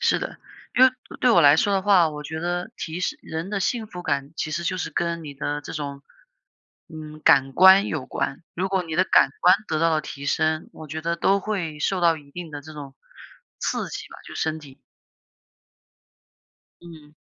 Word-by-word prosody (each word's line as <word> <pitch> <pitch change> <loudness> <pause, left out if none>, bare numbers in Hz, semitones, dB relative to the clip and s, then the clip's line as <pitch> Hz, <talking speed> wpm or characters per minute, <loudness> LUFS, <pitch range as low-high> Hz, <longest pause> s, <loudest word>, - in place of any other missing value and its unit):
是 - - +2
的， - - -6 0.4
因 255 - +7
为 260 - +6 0.3
对 250 - +4
我 220 - +6
来 145 -1 +7
说 205 - +2
的 195 -1 +1
话， 185 -5 +5
我 150 0 -7
觉 160 +2 -6
得 175 +4 -2
提 165 +2 -5
示 300 +11 -2
人 160 +3 -5
的 200 -2 -2
幸 225 +3 -1
福 180 -4 -9
感， 140 -1 -2
其 155 - -3
实 170 +3 -2
就 185 +2 -1
是 180 - -3
跟 170 -1 -2
你 145 - -7
的 145 +1 -3
这 - - -8
种， 140 -2 -5 0.9
嗯， 155 -1 -10
感 135 0 +5
官 190 +5 +7
有 150 -5 -3
关。 135 - -3
如 185 +3 -1
果 190 -1 0
你 160 -2 -6
的 185 - +3
感 135 - +4
官 180 +1 +7
得 155 - 0
到 165 +1 +3
了 155 -1 +2
提 140 -1 -8
升， 155 +1 0
我 155 - -10
觉 155 +2 -5
得 170 +1 -1
都 195 +3 +2
会 180 -7 -3
受 185 +5 0
到 170 -2 +4
一 145 -2 -15
定 175 +1 -8
的 145 -1 -7
这 155 +2 -12
种 140 -3 -9 0.6
刺 - - -2
激 - - -7
吧， - - -12
就 - - -10
身 160 0 -2
体。 140 -3 -14 2.0
嗯。 155 -3 -14
160 Hz, 220 characters per minute, -24 LUFS, 150-180 Hz, 2.0 s, 因